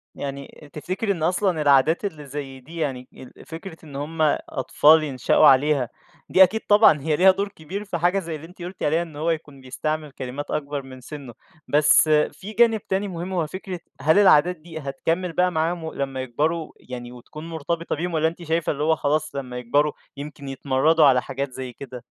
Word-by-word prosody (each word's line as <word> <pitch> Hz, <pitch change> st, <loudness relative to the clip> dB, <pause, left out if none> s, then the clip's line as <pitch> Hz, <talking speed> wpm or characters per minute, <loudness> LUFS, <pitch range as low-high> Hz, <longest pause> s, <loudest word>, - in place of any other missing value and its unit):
يعني 140 Hz, +1 st, -8 dB
تفتكري 185 Hz, +8 st, -2 dB
إن 165 Hz, -5 st, -3 dB
أصلًا 180 Hz, -2 st, +1 dB
العادات 145 Hz, +6 st, +3 dB
اللي 150 Hz, -6 st, -5 dB
زي 135 Hz, -1 st, -7 dB
دي 160 Hz, +6 st, -12 dB
يعني 130 Hz, -5 st, -3 dB
ال 130 Hz, -, -14 dB
فكرة 165 Hz, +1 st, -9 dB
إن 145 Hz, -3 st, -11 dB
هم 155 Hz, +3 st, -4 dB, 0.3 s
أطفال 155 Hz, +4 st, +4 dB
ينشئوا 135 Hz, -4 st, +3 dB
عليها، 135 Hz, -2 st, +4 dB, 0.4 s
دي 190 Hz, -, +7 dB
أكيد 220 Hz, +5 st, +1 dB
طبعًا 205 Hz, -9 st, +6 dB
هي 155 Hz, 0 st, 0 dB
ليها 190 Hz, +4 st, +6 dB
دور 200 Hz, +2 st, -2 dB
كبير 195 Hz, +2 st, -7 dB
في 180 Hz, -3 st, -3 dB
حاجة 180 Hz, +4 st, +2 dB
زي 165 Hz, -3 st, -5 dB
اللي 155 Hz, +2 st, -10 dB
أنتِ 180 Hz, 0 st, -16 dB
قُلتِ 180 Hz, +2 st, -7 dB
عليها، 160 Hz, +3 st, +2 dB
إن 165 Hz, -4 st, -8 dB
هو 160 Hz, +3 st, -1 dB
يكون 145 Hz, -4 st, -6 dB
بيستعمل 155 Hz, +3 st, -4 dB
كلمات 135 Hz, +2 st, -6 dB
أكبر 145 Hz, -1 st, -3 dB
من 130 Hz, -1 st, -12 dB
سِنّه، 135 Hz, -3 st, -9 dB, 0.3 s
بس 150 Hz, +1 st, +4 dB
في 155 Hz, +7 st, 0 dB
جانب 225 Hz, -1 st, +3 dB
تاني 195 Hz, +2 st, 0 dB
مهم، 180 Hz, +1 st, -5 dB
هو 165 Hz, -4 st, 0 dB
فكرة 185 Hz, +1 st, -6 dB, 0.2 s
هل 160 Hz, +7 st, +4 dB
العادات 180 Hz, -2 st, +5 dB
دي 160 Hz, 0 st, -9 dB
هتكمِّل 165 Hz, +6 st, -2 dB
بقى 180 Hz, +1 st, +2 dB
معاهم 165 Hz, +1 st, -1 dB
و 160 Hz, -, -5 dB
لمّا 135 Hz, -1 st, -3 dB
يكبروا 155 Hz, +6 st, -2 dB, 0.2 s
يعني 120 Hz, -1 st, -7 dB
وتكون 155 Hz, +6 st, -10 dB
مرتبطة 165 Hz, +1 st, -3 dB
بيهم 175 Hz, +2 st, -3 dB
والّا 160 Hz, 0 st, +2 dB
أنتِ 170 Hz, +1 st, -6 dB
شايفة 165 Hz, 0 st, 0 dB
اللي 150 Hz, 0 st, -3 dB
هو 160 Hz, +1 st, +3 dB
خلاص، 155 Hz, 0 st, -1 dB
لمّا 125 Hz, -2 st, -5 dB
يكبروا 145 Hz, +5 st, +1 dB, 0.3 s
يمكن 145 Hz, -1 st, -8 dB
يتمرّدوا 140 Hz, +4 st, +2 dB
على 130 Hz, -2 st, +5 dB
حاجات 135 Hz, 0 st, -4 dB
زي 130 Hz, -1 st, -7 dB
كده؟ 125 Hz, -2 st, -9 dB
155 Hz, 195 wpm, -23 LUFS, 140-170 Hz, 0.4 s, دي